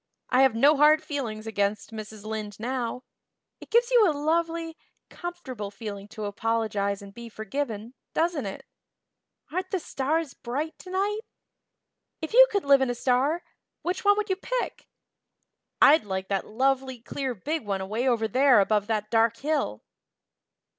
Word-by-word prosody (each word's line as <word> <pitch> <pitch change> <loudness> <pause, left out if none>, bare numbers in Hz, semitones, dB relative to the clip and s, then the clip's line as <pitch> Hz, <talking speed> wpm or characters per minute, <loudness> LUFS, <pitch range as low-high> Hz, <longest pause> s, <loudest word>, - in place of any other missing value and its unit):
I 255 +1 +5
have 265 -4 +4
no 285 +6 +5
hard 305 +2 +5
feelings 225 -7 -4
against 205 -1 -1
Mrs. 215 -1 -8
Lynde 215 -2 -5
now. 250 +1 -3 0.6
It - - -13
gives 475 +1 +3
you 455 -6 +6
a 300 - -1
lovely, 330 +2 0 0.4
comfortable 265 - -6
feeling 200 -1 -7
to 210 0 -6
apologize 205 -2 -1
and 200 0 -11
be 235 +2 -9
forgiven, 220 +1 -4 0.2
doesn't 325 -8 0
it? 195 - -7 0.9
Aren't 370 +3 -2
the 385 - 0
stars 310 0 -1
bright 285 +6 -4
tonight? 390 +3 -1 1.0
If 315 - -5
you - - +9
could 405 -5 0
live 280 -1 +6
in 265 - +1
a 245 - -1
star, 265 +8 +1 0.4
which 360 +1 -2
one 410 0 +5
would 425 -2 -1
you 375 - +1
pick? - - -3 0.9
I'd 305 +3 +7
like 190 -2 -4
that 195 -2 -1
lovely 265 +2 0
clear 255 +2 -4
big 305 - -3
one 200 -2 -2
away 215 +7 -2
over 230 -3 +2
there 260 +1 +5
above 205 0 +2
that 215 -2 -2
dark 230 0 +3
hill." 280 - -1
255 Hz, 155 wpm, -27 LUFS, 215-315 Hz, 1.0 s, you